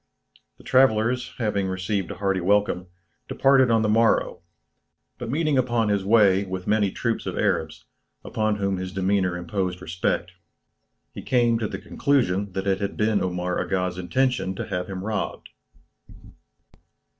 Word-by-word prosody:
The -, -, -17 dB
travellers 125 Hz, -1 st, +2 dB
having 105 Hz, -4 st, -1 dB
received 95 Hz, +1 st, -2 dB
a -, -, -6 dB
hearty 95 Hz, -1 st, -1 dB
welcome, 100 Hz, -1 st, +1 dB, 0.4 s
departed 135 Hz, -2 st, +4 dB
on 115 Hz, -1 st, +3 dB
the -, -, +1 dB
morrow, 115 Hz, +2 st, +2 dB, 0.8 s
but 120 Hz, -2 st, -5 dB
meeting 150 Hz, 0 st, +1 dB
upon 120 Hz, -3 st, +1 dB
his 100 Hz, -2 st, +1 dB
way 100 Hz, -2 st, +4 dB
with 95 Hz, -1 st, -6 dB
many 105 Hz, -2 st, +2 dB
troops 115 Hz, +4 st, -3 dB
of -, -, -4 dB
Arabs, 80 Hz, -1 st, -1 dB, 0.4 s
upon 110 Hz, -1 st, 0 dB
whom 100 Hz, -2 st, -1 dB
his 95 Hz, 0 st, -5 dB
demeanour 95 Hz, -1 st, 0 dB
imposed 90 Hz, +1 st, -3 dB
respect, 85 Hz, +2 st, -2 dB, 0.8 s
he -, -, -7 dB
came 120 Hz, -2 st, +2 dB
to 110 Hz, -, -1 dB
the -, -, -5 dB
conclusion 100 Hz, -9 st, 0 dB
that 95 Hz, +1 st, -3 dB
it 95 Hz, -1 st, +1 dB
had 100 Hz, -, -3 dB
been 105 Hz, -1 st, +1 dB
Omar 90 Hz, 0 st, -2 dB
Aga's 90 Hz, -1 st, -2 dB
intention 95 Hz, 0 st, 0 dB
to -, -, -5 dB
have 90 Hz, -2 st, -3 dB
him 95 Hz, -1 st, -6 dB
robbed. 110 Hz, 0 st, -4 dB
100 Hz, 150 wpm, -24 LUFS, 95-115 Hz, 0.8 s, departed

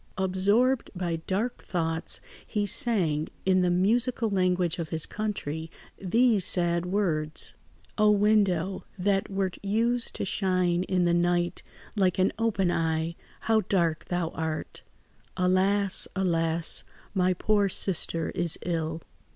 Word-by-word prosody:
Absorbed 200 Hz, +7 st, +1 dB
by 175 Hz, -2 st, -2 dB
dark 220 Hz, +6 st, -2 dB
thoughts, 165 Hz, -2 st, -1 dB, 0.3 s
he 210 Hz, -1 st, -1 dB
sang, 175 Hz, -9 st, +1 dB, 0.2 s
in 185 Hz, -1 st, +3 dB
the 180 Hz, -, +2 dB
musical 225 Hz, +5 st, +1 dB
language 180 Hz, -2 st, +1 dB
of 165 Hz, -2 st, -4 dB
his 160 Hz, -2 st, 0 dB
country, 165 Hz, -7 st, -4 dB, 0.3 s
these 220 Hz, +2 st, +2 dB
sad 170 Hz, 0 st, +2 dB
words:— 160 Hz, -6 st, -1 dB, 0.5 s
"O 215 Hz, 0 st, +5 dB
window, 200 Hz, -3 st, +2 dB
that 195 Hz, +1 st, 0 dB
wert 195 Hz, -2 st, -2 dB
used 230 Hz, +4 st, 0 dB
to -, -, -2 dB
shine 185 Hz, -3 st, +1 dB
in 180 Hz, -2 st, +1 dB
the 170 Hz, -, +2 dB
night 175 Hz, 0 st, +1 dB, 0.3 s
like 190 Hz, -3 st, +1 dB
an 190 Hz, +1 st, +2 dB
open 200 Hz, -6 st, +1 dB
eye, 165 Hz, 0 st, -1 dB, 0.3 s
how 220 Hz, -1 st, +2 dB
dark 170 Hz, -5 st, +1 dB
thou 175 Hz, -2 st, -2 dB
art! 160 Hz, -1 st, -5 dB, 0.6 s
Alas, 190 Hz, +2 st, +3 dB
alas! 165 Hz, -3 st, +2 dB, 0.3 s
my 185 Hz, -2 st, +2 dB
poor 205 Hz, +1 st, +1 dB
sister 165 Hz, -3 st, 0 dB
is 175 Hz, -3 st, 0 dB
ill. 165 Hz, -2 st, -2 dB
185 Hz, 125 wpm, -27 LUFS, 170-205 Hz, 0.6 s, O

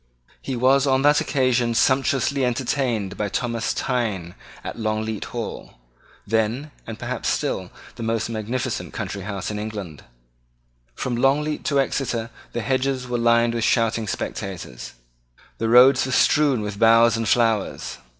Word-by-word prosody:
He 135 Hz, -, -4 dB
was 135 Hz, +3 st, +3 dB
on 135 Hz, 0 st, +2 dB
that 145 Hz, 0 st, +5 dB
occasion 125 Hz, -3 st, +1 dB
sumptuously 135 Hz, +2 st, +2 dB
entertained 125 Hz, -4 st, -1 dB
by 105 Hz, -1 st, -1 dB
Thomas 115 Hz, +2 st, -1 dB
Thynne 105 Hz, -9 st, -2 dB, 0.3 s
at -, -, -6 dB
Longleat 110 Hz, -1 st, -2 dB
Hall, -, -, -6 dB, 0.5 s
then, 115 Hz, +7 st, -1 dB, 0.2 s
and 115 Hz, -1 st, -6 dB
perhaps 120 Hz, +1 st, -3 dB
still, -, -, -1 dB, 0.3 s
the -, -, -7 dB
most 115 Hz, -1 st, -1 dB
magnificent 115 Hz, +2 st, -3 dB
country 100 Hz, -, -4 dB
house 100 Hz, 0 st, -4 dB
in 105 Hz, -, -4 dB
England. 100 Hz, -8 st, -6 dB, 0.9 s
From 125 Hz, -, -2 dB
Longleat 145 Hz, +5 st, +1 dB
to 140 Hz, -2 st, +2 dB
Exeter 120 Hz, -4 st, -1 dB, 0.2 s
the 120 Hz, -, -3 dB
hedges 130 Hz, +1 st, -1 dB
were 120 Hz, -1 st, -1 dB
lined 115 Hz, 0 st, +3 dB
with 115 Hz, -1 st, -1 dB
shouting 115 Hz, -1 st, +1 dB
spectators. 90 Hz, -10 st, -5 dB, 0.7 s
The 115 Hz, -, 0 dB
roads 130 Hz, +2 st, +6 dB
were -, -, -3 dB
strewn 140 Hz, -4 st, +3 dB
with 105 Hz, -1 st, -5 dB
boughs 115 Hz, +1 st, +6 dB
and 115 Hz, -2 st, -1 dB
flowers. 115 Hz, -4 st, 0 dB
115 Hz, 140 wpm, -23 LUFS, 110-130 Hz, 0.9 s, roads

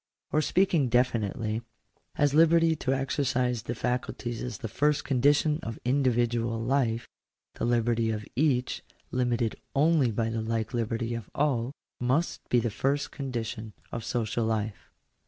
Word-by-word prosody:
Or, 155 Hz, -, +3 dB
speaking 170 Hz, -6 st, +2 dB
definitely, 115 Hz, -2 st, +1 dB, 0.5 s
as 145 Hz, -2 st, +2 dB
liberty 165 Hz, +1 st, +5 dB
to 135 Hz, -4 st, -2 dB
exercise 130 Hz, -2 st, 0 dB
the 120 Hz, +1 st, -4 dB
faculties 125 Hz, -1 st, -2 dB
is 125 Hz, -, -4 dB
the 125 Hz, -, -5 dB
first 145 Hz, +7 st, +1 dB
condition 145 Hz, +3 st, +3 dB
of 115 Hz, -8 st, -5 dB
individual 120 Hz, -3 st, +1 dB
life, 120 Hz, -1 st, 0 dB, 0.5 s
the -, -, -3 dB
liberty 120 Hz, -1 st, +2 dB
of 105 Hz, -1 st, -3 dB
each, 130 Hz, -2 st, +1 dB, 0.3 s
limited 120 Hz, -2 st, 0 dB, 0.2 s
only 150 Hz, -2 st, +4 dB
by 115 Hz, +1 st, -1 dB
the 115 Hz, 0 st, -2 dB
like 110 Hz, +1 st, -2 dB
liberty 115 Hz, 0 st, -1 dB
of 115 Hz, -3 st, -5 dB
all, 135 Hz, -4 st, +1 dB, 0.3 s
must 130 Hz, +8 st, 0 dB
be 125 Hz, -, +4 dB
the 115 Hz, -1 st, -1 dB
first 140 Hz, +6 st, 0 dB
condition 115 Hz, -5 st, -4 dB, 0.2 s
of 115 Hz, -, -4 dB
social 115 Hz, -1 st, -1 dB
life. 110 Hz, -1 st, -2 dB
120 Hz, 140 wpm, -28 LUFS, 115-140 Hz, 0.5 s, liberty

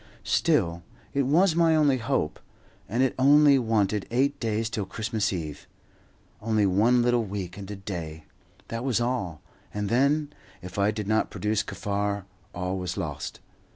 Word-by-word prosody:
Still, 85 Hz, 0 st, +1 dB, 0.3 s
it 140 Hz, -2 st, +1 dB
was 165 Hz, +4 st, +4 dB
my 165 Hz, -1 st, +4 dB
only 145 Hz, -4 st, +3 dB
hope, 115 Hz, -, -1 dB, 0.5 s
and 120 Hz, +5 st, +1 dB
it 130 Hz, -, +1 dB
only 145 Hz, +1 st, +6 dB
wanted 105 Hz, -4 st, 0 dB
eight 140 Hz, +4 st, +1 dB
days 110 Hz, -1 st, -1 dB
to 110 Hz, -3 st, -2 dB
Christmas 110 Hz, +2 st, -2 dB
Eve. 80 Hz, -6 st, -5 dB, 0.7 s
Only 110 Hz, -1 st, +2 dB
one 110 Hz, +6 st, +3 dB
little 120 Hz, -1 st, +2 dB
week 95 Hz, -4 st, -5 dB
and 100 Hz, -1 st, -8 dB
a 105 Hz, -, -5 dB
day, 85 Hz, -5 st, -6 dB, 0.5 s
that 115 Hz, +1 st, -4 dB
was 130 Hz, -4 st, +1 dB
all, 120 Hz, -10 st, -2 dB, 0.3 s
and 105 Hz, -1 st, -3 dB
then, 145 Hz, +5 st, +2 dB, 0.3 s
if 90 Hz, +2 st, -7 dB
I 100 Hz, +1 st, +3 dB
did 105 Hz, -1 st, -3 dB
not 110 Hz, +1 st, +1 dB
produce 105 Hz, 0 st, -1 dB
Kaffar, 100 Hz, -2 st, -3 dB, 0.3 s
all 90 Hz, +1 st, -3 dB
was 90 Hz, 0 st, -4 dB
lost. 75 Hz, -7 st, -5 dB
110 Hz, 155 wpm, -26 LUFS, 95-125 Hz, 0.7 s, only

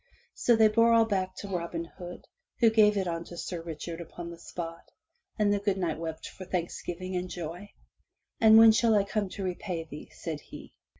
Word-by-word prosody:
So 240 Hz, -, +3 dB
they 220 Hz, -1 st, +6 dB
bore 230 Hz, +2 st, +4 dB
all 230 Hz, -1 st, +6 dB
back 190 Hz, -3 st, -1 dB
to 200 Hz, -, -7 dB
Robin 170 Hz, -3 st, -3 dB
Hood, 175 Hz, +1 st, -10 dB, 0.3 s
who 230 Hz, -2 st, +6 dB
gave 210 Hz, -2 st, +5 dB
it 190 Hz, -2 st, 0 dB
unto 170 Hz, 0 st, -4 dB
Sir 175 Hz, 0 st, -4 dB
Richard 165 Hz, +1 st, -6 dB
upon 170 Hz, +1 st, -8 dB
the 170 Hz, -, -11 dB
spot, 165 Hz, -1 st, -7 dB, 0.5 s
and 205 Hz, -2 st, +3 dB
the 205 Hz, -, +1 dB
good 200 Hz, -1 st, 0 dB
Knight 170 Hz, -4 st, -1 dB
wept 160 Hz, -1 st, -5 dB
for 190 Hz, -, -10 dB
thanks 175 Hz, -2 st, -3 dB
giving 185 Hz, +2 st, -5 dB
and 180 Hz, 0 st, -2 dB
joy. 175 Hz, +4 st, -6 dB, 0.7 s
"And 220 Hz, -1 st, +8 dB
when 225 Hz, 0 st, +9 dB
shall 225 Hz, 0 st, +3 dB
I 205 Hz, -, +4 dB
come 200 Hz, -1 st, -2 dB
to 195 Hz, -, -6 dB
repay 180 Hz, -2 st, -3 dB
thee?'' 150 Hz, -2 st, -10 dB
said 155 Hz, -3 st, -6 dB
he. -, -, -12 dB
185 Hz, 200 wpm, -29 LUFS, 170-210 Hz, 0.7 s, when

